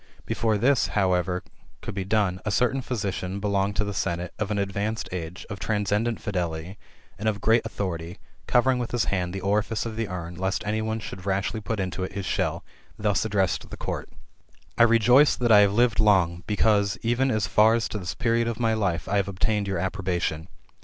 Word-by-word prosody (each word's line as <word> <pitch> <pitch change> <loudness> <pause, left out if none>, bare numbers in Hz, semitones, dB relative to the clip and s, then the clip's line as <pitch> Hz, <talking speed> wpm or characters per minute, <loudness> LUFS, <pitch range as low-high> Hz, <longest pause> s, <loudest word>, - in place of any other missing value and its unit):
Before 110 -2 0
this, 130 +4 +3
however, 90 -2 +1 0.4
could - - -5
be 95 -1 -3
done, 95 -3 +1
a - - -2
certain 125 +5 +1
physician 100 -6 -3
belonging 100 0 0
to 105 - +1
the 100 -1 -3
senate, 85 -1 -2
of 105 - -1
an 105 - -1
advanced 100 +2 -2
age, 90 0 -6
of 100 -3 -7
transcendent 105 +2 0
fidelity, 90 -1 -3 0.4
and 110 +2 +1
of 105 -2 -3
great 110 +3 +3
authority, 85 -5 -4 0.3
covering 125 +1 +3
with 120 - -3
his 120 -2 0
hand 90 -2 -1
the 95 +1 -5
orifice 105 +3 0
of 115 -2 -4
the 115 -1 -1
urn, 90 -2 -5
lest 95 +1 -2
any 105 +1 0
one 110 0 -2
should 95 -3 -8
rashly 100 +3 -1
put 110 0 -3
into 95 -1 -2
it 95 - -5
his 100 -1 -4
shell, - - -1 0.3
thus 105 0 +1
addressed 100 -4 0
the - - -8
court: - - -4 0.4
" - - -33
I - - +8
rejoice 120 +6 +5
that 120 -2 +1
I 105 - +9
have 100 -1 +4
lived 120 -1 +3
long, 90 -5 +3
because, 105 -1 +2
even 120 +3 +2
as 110 -5 +1
far 105 +5 +4
as 115 - 0
to 105 - -4
this 90 -3 -5
period 115 0 +1
of 115 -1 -3
my 115 -2 +2
life, 95 -6 -1
I 100 - +1
have 100 -1 +1
obtained 100 +1 -1
your 95 -2 -1
ap 95 +2 -1
probation. 90 -4 -2
100 Hz, 205 wpm, -25 LUFS, 95-110 Hz, 0.4 s, I